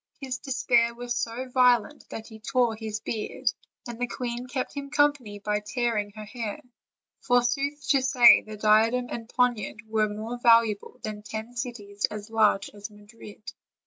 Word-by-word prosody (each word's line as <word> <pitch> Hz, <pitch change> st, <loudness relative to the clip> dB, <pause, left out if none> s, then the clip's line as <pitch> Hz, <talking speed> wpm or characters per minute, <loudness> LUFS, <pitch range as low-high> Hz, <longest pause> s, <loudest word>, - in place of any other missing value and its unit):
His 260 Hz, -3 st, -4 dB
despair 240 Hz, -4 st, +1 dB
was 240 Hz, 0 st, -4 dB
so 245 Hz, +1 st, -3 dB
violent 250 Hz, -3 st, +2 dB
that 220 Hz, -, -7 dB
he 220 Hz, -1 st, -12 dB
tore 240 Hz, 0 st, +1 dB
his 215 Hz, -1 st, -5 dB
beard; 215 Hz, -1 st, -2 dB, 0.4 s
and 240 Hz, -1 st, -7 dB
the 245 Hz, -, +1 dB
queen 245 Hz, 0 st, -4 dB
kept 255 Hz, 0 st, -3 dB
him 280 Hz, 0 st, -5 dB
company 290 Hz, -8 st, +1 dB
by 210 Hz, 0 st, -1 dB
tearing 220 Hz, -1 st, -1 dB
her 215 Hz, -1 st, -8 dB
hair, 220 Hz, -1 st, -5 dB, 0.6 s
for, 245 Hz, -1 st, +3 dB
sooth 280 Hz, +4 st, -2 dB
to 275 Hz, -2 st, +4 dB
say, 245 Hz, -2 st, +7 dB
the 215 Hz, 0 st, -10 dB
diadem 220 Hz, +4 st, +3 dB
and 230 Hz, -1 st, -6 dB
poniard 240 Hz, -3 st, 0 dB
were 215 Hz, -1 st, +1 dB
more 220 Hz, +4 st, -5 dB
valuable 230 Hz, -3 st, +3 dB
than 215 Hz, -1 st, -5 dB
ten 220 Hz, +3 st, -7 dB
cities 210 Hz, -4 st, -3 dB
as 210 Hz, +1 st, -8 dB
large 215 Hz, -3 st, +2 dB
as 205 Hz, +1 st, -8 dB
Madrid. 210 Hz, 0 st, -12 dB
230 Hz, 165 wpm, -26 LUFS, 215-245 Hz, 0.6 s, say